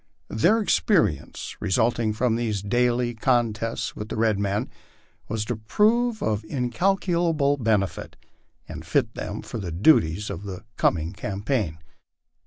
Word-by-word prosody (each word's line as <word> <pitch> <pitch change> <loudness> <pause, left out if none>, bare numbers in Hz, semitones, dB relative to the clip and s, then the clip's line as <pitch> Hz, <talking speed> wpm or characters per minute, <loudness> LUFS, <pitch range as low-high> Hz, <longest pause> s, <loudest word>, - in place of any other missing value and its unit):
Their 210 - +2 0.2
lence, 135 - 0
resulting 115 +2 +1
from 115 +2 +1
these 110 -4 -2
daily 120 +2 +1
contests 115 -2 0
with 105 +1 -6
the - - -4
red 110 -2 +2
men, 100 0 -1 0.6
was 110 -1 -2
to 120 - -2
prove 220 - +1
of 105 -1 0
incalculable 160 - +1
benefit, 105 - -1 0.5
and - - -8
fit - - 0
them - - -5
for 115 - -6
the 90 -4 -5
duties 90 - +3
of 85 - -6
the 100 0 -8
coming 80 +1 +1
campaign. 100 - -2
115 Hz, 130 wpm, -25 LUFS, 100-135 Hz, 0.6 s, duties